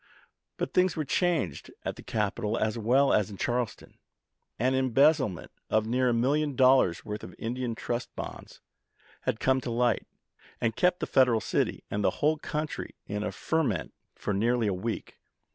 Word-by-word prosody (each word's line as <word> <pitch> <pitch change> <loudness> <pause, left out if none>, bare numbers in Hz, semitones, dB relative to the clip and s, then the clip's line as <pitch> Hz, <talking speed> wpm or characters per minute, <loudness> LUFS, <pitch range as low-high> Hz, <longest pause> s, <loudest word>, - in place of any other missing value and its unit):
But - - -3
things 180 -2 +3
were 155 - -2
changed 175 +1 0 0.2
at - - -2
the - - -11
capital 110 +1 -1
as 110 +1 0
well 125 +5 +3
as 105 -1 +2
in 100 - -9
Charleston. 120 +2 -3 0.6
An 130 +3 +2
embezzlement 130 - +2 0.2
of 110 0 +2
near 125 +2 +2
a - - +3
million 140 +5 +1
dollars' 130 -9 +4
worth 105 0 -5
of 90 - -9
Indian 120 0 -3
Trust 120 +2 -3
Bonds - - -8 0.7
had 110 - -1
come 130 0 +2
to 125 - -4
light, 120 -1 +1 0.5
and 115 -1 0
kept 180 0 +2
the - - +1
Federal 125 -4 +4
city - - -1
and 105 0 -1
the - - +4
whole 155 +1 +2
country 155 0 -4
in 105 +1 -3
a - - -2
ferment 150 - -1 0.2
for 105 - -3
nearly 115 +4 +2
a 100 - +1
week. 110 +5 -4
120 Hz, 170 wpm, -28 LUFS, 110-135 Hz, 0.7 s, dollars